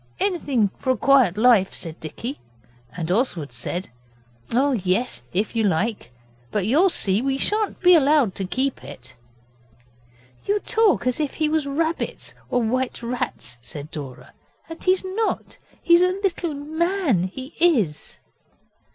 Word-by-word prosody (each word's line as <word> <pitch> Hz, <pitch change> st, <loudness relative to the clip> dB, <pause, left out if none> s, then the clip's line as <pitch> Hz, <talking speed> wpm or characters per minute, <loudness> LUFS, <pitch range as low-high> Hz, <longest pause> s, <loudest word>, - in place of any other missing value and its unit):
'Anything 280 Hz, -, +1 dB
for -, -, -3 dB
a -, -, -6 dB
quiet 255 Hz, -6 st, +4 dB
life,' 220 Hz, -4 st, +4 dB
said 165 Hz, -2 st, -5 dB
Dicky, 230 Hz, -, -6 dB, 0.6 s
and 170 Hz, -1 st, -2 dB
Oswald 180 Hz, -, 0 dB
said 125 Hz, +7 st, -4 dB, 0.6 s
'Oh, 270 Hz, +4 st, +2 dB
yes, 215 Hz, -, -1 dB
if 205 Hz, +5 st, -1 dB
you 225 Hz, -, +2 dB
like. 200 Hz, -, -1 dB, 0.4 s
But 200 Hz, +4 st, -1 dB
you'll 310 Hz, -, +4 dB
see 200 Hz, -, +2 dB
we 270 Hz, +1 st, 0 dB
shan't 425 Hz, +7 st, 0 dB
be 360 Hz, -1 st, +7 dB
allowed 290 Hz, -, +4 dB
to 195 Hz, -, -4 dB
keep 260 Hz, +7 st, -1 dB
it.' 125 Hz, +1 st, -10 dB, 1.3 s
'You 410 Hz, +1 st, +1 dB
talk 440 Hz, -, +2 dB
as 250 Hz, +2 st, +1 dB
if 295 Hz, -3 st, -2 dB
he 310 Hz, -, +1 dB
was 310 Hz, -2 st, 0 dB
rabbits 320 Hz, +4 st, -2 dB, 0.2 s
or 245 Hz, -1 st, +1 dB
white 250 Hz, +2 st, -1 dB
rats,' 235 Hz, -, -4 dB
said 145 Hz, +5 st, -8 dB
Dora, 130 Hz, -4 st, -9 dB, 0.3 s
'and 330 Hz, 0 st, -10 dB
he's 370 Hz, 0 st, +2 dB
not 415 Hz, +4 st, -3 dB, 0.2 s
he's 340 Hz, 0 st, +6 dB
a 365 Hz, -, +5 dB, 0.2 s
little 345 Hz, -5 st, -1 dB
man, 315 Hz, -, 0 dB
he 260 Hz, -, -8 dB
is. 240 Hz, -, +1 dB
255 Hz, 145 wpm, -23 LUFS, 190-320 Hz, 1.3 s, be